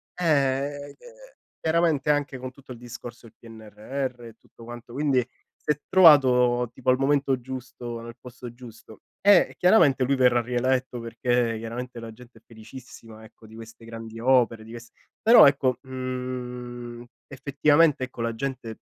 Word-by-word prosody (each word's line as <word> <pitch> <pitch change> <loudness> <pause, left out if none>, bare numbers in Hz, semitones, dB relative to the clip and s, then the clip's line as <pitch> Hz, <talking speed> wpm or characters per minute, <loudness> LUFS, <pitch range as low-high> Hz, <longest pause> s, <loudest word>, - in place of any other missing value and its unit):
ehm, 145 -4 0
ehm, - - -16 0.7
chiaramente 160 -3 +1
anche 145 -2 -2
con 130 0 -7
tutto 130 -1 -13
il - - -13
discorso 120 0 -11
del - - -20
PNRR 115 +3 -7
e 115 - -11
tutto 115 - -18
quanto, 120 0 -11
quindi 140 -2 +1 0.4
si - - -3
è 150 - -2
trovato 125 -8 +5
tipo 130 - -3
al 130 - +4
momento 135 -1 +1
giusto, 120 -2 -8
nel 115 0 -11
posto 125 -1 -11
giusto. 115 -3 -14 0.3
E 200 -3 +5
chiaramente 150 -9 +4
lui 135 +2 +1
verrà 125 -2 +3
rieletto 125 +1 -1
perché 115 0 -1
chiaramente 120 +2 -7
la 115 - -8
gente 120 +1 -17
è - - -38
felicissima 115 -1 -13
ecco 110 0 -17
di 110 - -15
queste 115 0 -13
grandi 115 0 -9
opere, 120 -3 +2
di 115 - -13
quest 120 0 -11 0.3
però 230 -6 +8
ecco, 135 -3 +1
mhmm, 125 -2 -6 0.3
effettivamente 145 +2 +2
ecco 130 - -16
la 115 -1 -2
gente 125 -3 -6
125 Hz, 155 wpm, -25 LUFS, 115-135 Hz, 0.7 s, però